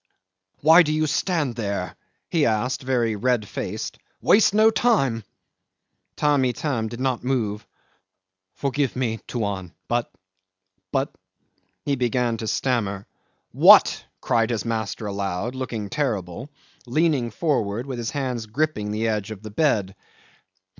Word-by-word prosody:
"Why 160 +4 +8
do 155 -3 +1
you 155 0 +1
stand 150 - -1
here?" 100 -5 -3 0.4
he 160 -4 +3
asked 115 +5 0
very 120 -4 0
red 115 0 0
faced. - - -5 0.2
"Waste 210 0 +5
no 215 +2 +5
time." 135 - +2 0.9
Tamb' 145 -3 +2
Itam 125 -2 -1
did 120 +2 -7
not 130 -3 -1
move. 115 -5 -1 0.9
"Forgive 140 -1 -1
me, 115 -3 -1
Tuan, 100 -6 -3 0.2
but... 120 0 -1 0.8
but," - - -1 0.7
he 140 - +1
began 120 -1 0
to 110 0 -5
stammer. 105 -6 -1 0.5
"What?" - - +7 0.2
cried 115 -1 +1
his 115 -2 -2
master 110 -1 -3
aloud, 100 +2 -3
looking 120 -5 -4
terrible, 115 - -3 0.4
leaning 140 -2 +1
forward 115 -4 -1
with 130 -3 -5
his 115 -1 -2
hands 125 -5 -3
gripping 110 -3 -1
the 110 +2 -1
edge 105 -1 -1
of 110 -1 -8
the 110 - -8
bed. 105 -7 +1
120 Hz, 130 wpm, -24 LUFS, 105-140 Hz, 0.9 s, Why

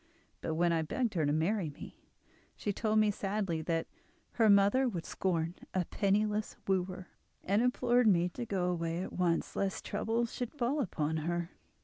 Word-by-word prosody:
But 160 - -2
when 170 +1 +3
I 165 - +2
begged 225 +8 -1
her 160 -5 +1
to - - +2
marry 165 +3 +1
me, 145 - -12 0.5
she 205 - -2
told 215 +1 0
me 215 -1 +4
sadly 195 -5 -2
that 165 0 -1 0.5
her 225 -2 +3
mother 205 +6 +5
would 175 -7 -5
scorn 170 -3 -1 0.2
a 185 -2 +1
penniless 210 +2 0
wooer, 185 -1 -1 0.3
and 200 +4 +2
implored 250 -1 +3
me 175 -4 +4
to 230 +6 -6
go 180 -3 0
away 170 0 -2
at - - -7
once, 175 -2 0
lest 195 -1 -2
trouble 230 +2 0
should 240 +1 -5
fall 280 +2 0
upon 160 - -1
her. 170 +2 -2
190 Hz, 170 wpm, -32 LUFS, 170-215 Hz, 0.5 s, mother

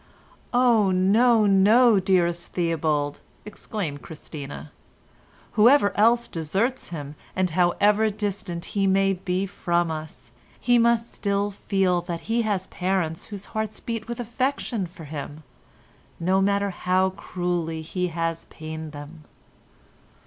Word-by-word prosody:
"Oh, 240 -5 +4
no! 215 +5 +4
no! 210 +3 +5
dearest 175 -2 +1
Theobald," 155 -4 0 0.3
exclaimed 200 -8 -5
Christina. 150 -2 -8 0.8
"Whoever 220 -2 +5
else 235 +3 +4
deserts 195 - -2
him, 145 -4 -6 0.2
and 185 -2 +1
however 205 +5 +3
distant 200 -4 -4
he 195 -1 +2
may 195 0 +3
be 185 +1 -2
from 175 -3 -1
us, 155 0 -8 0.3
he 245 -1 +3
must 235 0 +2
still 200 0 -1
feel 190 -3 0
that 170 -1 -5
he 230 +5 0
has 205 -4 -1
parents 180 -4 -2
whose 205 -2 -8
hearts 220 -1 -2
beat 230 -2 -5
with 235 0 -5
affection 240 -3 -2
for 170 -1 -13
him 150 0 -7 0.8
no 185 +3 +2
matter 200 0 +1
how 185 +1 +1
cruelly 175 -3 -3
he 180 +3 -2
has 165 -1 -3
pained 155 -1 -8
them." 150 +2 -10
190 Hz, 125 wpm, -24 LUFS, 165-210 Hz, 0.8 s, no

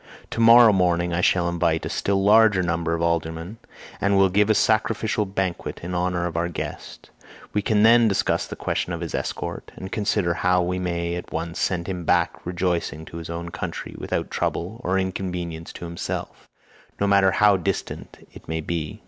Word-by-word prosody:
To - - -4
morrow 115 -1 +8
morning 90 -2 +1
I 85 - 0
shall 90 -1 +2
invite 85 -2 0
a - - -3
still 95 -1 0
larger 105 -2 +5
number 85 -1 -1
of 85 - -2
aldermen, 85 +4 -2 0.4
and 100 0 +2
will 95 0 +5
give 105 +3 +2
a 110 - +4
sacrificial 110 -1 +1
banquet 95 -2 -3
in 90 +1 -5
honour 90 0 0
of 85 - -4
our 85 +1 0
guest; 85 - -7 0.4
we 105 - +1
can 105 0 +2
then 115 +1 +6
discuss 100 - 0
the - - -7
question 90 - -2
of 85 - -5
his 85 - -5
escort, - - -4
and 95 - -8
consider 100 -4 0
how 90 +1 +2
we 90 +1 -2
may 85 -1 -2
at 90 - -6
once 85 +1 -4
send 90 -3 0
him 90 -2 -4
back - - +1
rejoicing 85 -3 -2
to 85 - -9
his 85 0 -7
own 85 0 -5
country 90 -1 -6
without - - -3
trouble 105 +8 -3
or 95 +1 +1
inconvenience 90 -3 -4
to - - -8
himself, 85 0 -6 0.5
no 100 - +2
matter 100 -1 +4
how 100 +2 +4
distant 95 0 -4
it - - -14
may 80 0 -2
be. 80 -1 -4
90 Hz, 190 wpm, -23 LUFS, 85-100 Hz, 0.5 s, morrow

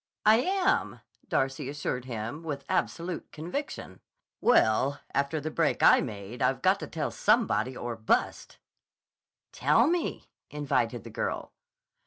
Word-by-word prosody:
"I 215 +1 +7
am," 380 +5 +1 0.3
Darcy 135 +1 0
assured 140 -3 -3
him 120 +4 -5
with 145 -4 -5
absolute 165 +11 -2
conviction. 180 - -6 0.4
"Well, 135 - +3
after 140 +3 0
the 155 +2 -4
break - - +1
I - - +7
made 105 +3 -7
I've 130 0 +1
got 190 +2 +4
to - - -6
tell 155 -2 -3
somebody 130 - +1
or 120 -1 -4
bust." 110 0 -1 0.9
"Tell - - +3
me," 340 +2 -1 0.2
invited 130 -6 -1
the - - -10
girl. - - -3
140 Hz, 130 wpm, -28 LUFS, 120-180 Hz, 0.9 s, I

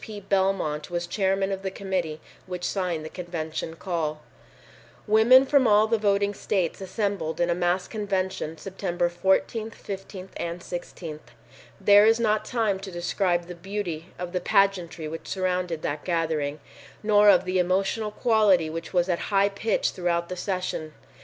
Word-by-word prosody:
P. 215 -2 -7
Belmont 190 -6 0
was 175 0 -2
chairman 195 +2 0
of 195 0 -3
the 195 - -2
committee 185 -5 -3 0.3
which 180 -1 -5
signed 175 -4 -1
the - - -4
convention 160 -2 -5
call. 160 -4 -3 0.8
Women 225 +5 +6
from 275 -2 +4
all 210 0 +5
the 225 0 +1
voting 200 -1 +2
states 190 -3 -1
assembled 195 -5 -2
in 175 0 +2
a - - +4
mass 175 +1 0
convention 190 -6 -2
September 175 0 -2
14, 190 +5 +1
15 195 -3 -8
and 170 +1 -4
16. 170 -3 -6 0.6
There 205 +1 +7
is 225 +1 +4
not 215 -2 +1
time 220 -6 0
to 195 0 -7
describe 175 0 0
the 180 - -7
beauty 175 -2 -5
of 180 0 -5
the 180 0 -1
pageantry 180 -4 +1
which 165 +1 -7
surrounded 180 -3 -1
that 145 0 -3
gathering, 155 -4 -1 0.4
nor 210 -1 +6
of 190 -3 +5
the 185 0 0
emotional 195 +4 +1
quality 210 -7 +3
which 165 +3 -6
was 175 -1 +2
at 175 -2 0
high 200 0 +3
pitch 205 +2 0
throughout 170 -1 -1
the 185 - -4
sessions. 180 -5 -3
185 Hz, 160 wpm, -26 LUFS, 170-200 Hz, 0.8 s, There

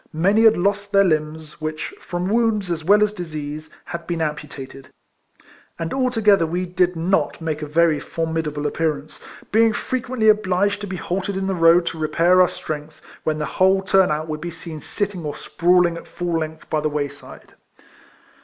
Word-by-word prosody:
Many 195 +8 +3
had 225 - +6
lost 200 +2 0
their 200 -1 +5
limbs, 155 -2 -2
which, 155 0 -4
from 175 +1 -3
wounds 215 -3 +1
as 160 -2 -2
well 205 +5 +5
as 210 0 0
disease, 155 -4 -6 0.2
had 170 -1 -7
been 170 -1 -2
amputated; 150 -3 -5 0.9
and 165 -1 -4
altogether 225 -9 +3
we 175 +3 -2
did 180 0 +1
not 165 -2 0
make 160 -2 -3
a 150 - -4
very 160 0 +3
formidable 160 -3 -3
appearance, 155 -1 -2 0.3
being 225 +1 +4
frequently 245 -2 -1
obliged 205 -1 +2
to 205 - -5
be 190 - -5
halted 190 +2 -3
in 190 - -2
the 195 - 0
road 170 0 +5
to 165 - -4
repair 170 +4 +3
our 180 - +6
strength^ 155 -1 -7 0.2
when 155 -1 0
the 150 - -2
whole 190 +3 +2
turn 190 -1 +4
out 155 +1 -2
would 155 -1 -4
be 175 - -4
seen 165 -2 -8
sitting 200 -4 -3
or 150 -1 -4
sprawling 175 0 +2
at - - -11
full 170 -1 -2
length 160 0 -6
by 155 - 0
the 155 - 0
way 145 -1 -1
side. 140 0 -14
170 Hz, 180 wpm, -21 LUFS, 155-195 Hz, 0.9 s, had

